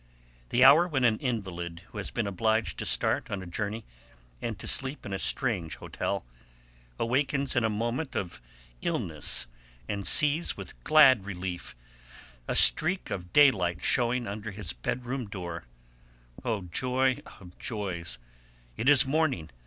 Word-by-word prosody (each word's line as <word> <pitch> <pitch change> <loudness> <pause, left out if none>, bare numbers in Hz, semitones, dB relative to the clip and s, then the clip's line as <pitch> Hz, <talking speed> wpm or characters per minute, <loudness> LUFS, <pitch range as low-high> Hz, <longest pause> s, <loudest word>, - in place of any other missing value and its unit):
The 125 - +3
hour 150 +6 +7
when 135 -7 -1
an 110 -3 +3
invalid, 90 -9 -4
who 105 - -8
has 100 - -4
been 115 - -2
obliged 110 +3 -1
to - - -2
start - - 0
on 95 -2 -4
a - - -9
journey 105 +5 -4 0.6
and 115 -3 -4
to - - -6
sleep 135 +2 +1
in 100 - -5
a 95 - -3
strange 100 - 0
hotel, - - -4 0.7
awakens 135 +3 0
in 120 - +2
a 110 - +2
moment 120 +7 -3
of 90 -9 -4 0.4
illness 75 -5 -1 0.4
and 100 -1 -2
sees 150 +3 +3
with - - -9
glad 135 -9 +6
relief 90 -2 -6 0.7
a - - -1
streak 180 +4 +5
of 90 -2 -5
daylight 105 - +4
shewing 125 0 +2
under 105 +1 -6
his 100 -8 -6
bedroom 125 - -4
door. 85 - -7 0.8
Oh, 110 -4 -1
joy 130 +8 0 0.2
of 90 -2 -14
joys! 90 - -4 0.6
it 125 - +2
is 145 -3 +7
morning. 135 - -1
110 Hz, 145 wpm, -28 LUFS, 95-130 Hz, 0.8 s, hour